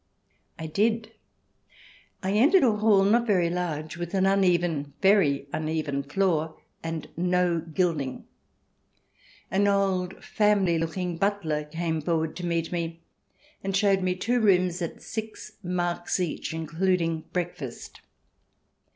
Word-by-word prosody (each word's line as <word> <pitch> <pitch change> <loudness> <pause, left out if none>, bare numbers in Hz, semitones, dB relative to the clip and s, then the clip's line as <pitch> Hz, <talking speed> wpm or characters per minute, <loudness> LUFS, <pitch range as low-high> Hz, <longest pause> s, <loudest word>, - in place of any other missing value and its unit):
I 160 - -6
did. 220 +6 0 1.1
I 190 - 0
entered 280 - +5
a 230 -5 +4
hall, 210 -2 +4
not 235 +4 +3
very 180 -5 +2
large, 165 -3 -3
with 175 +2 -4
an 190 0 +3
uneven 175 -7 +2
— - - -40
very 160 -9 +4
uneven 155 -3 -1
— 140 - -20
floor, 160 -3 0 0.2
and 165 -1 -4
no 180 0 +1
gilding. 160 -5 -2 1.3
An 200 +2 +3
old 190 -2 0
family 200 -5 +2
looking 170 +1 -2
butler 165 -6 0
came 160 +1 -2
forward 160 0 -1
to 180 - -4
meet 165 -1 -1
me, 170 -1 -4 0.6
and 195 0 0
showed 195 -1 +3
me 185 0 0
two 240 +6 0
rooms 185 -4 +3
at 170 - -5
six 220 -1 -6
marks 175 -1 -1
each, 175 -4 -2
in 160 0 -4
cluding 165 -1 0
breakfast. 165 -8 -5
175 Hz, 135 wpm, -26 LUFS, 160-195 Hz, 1.3 s, entered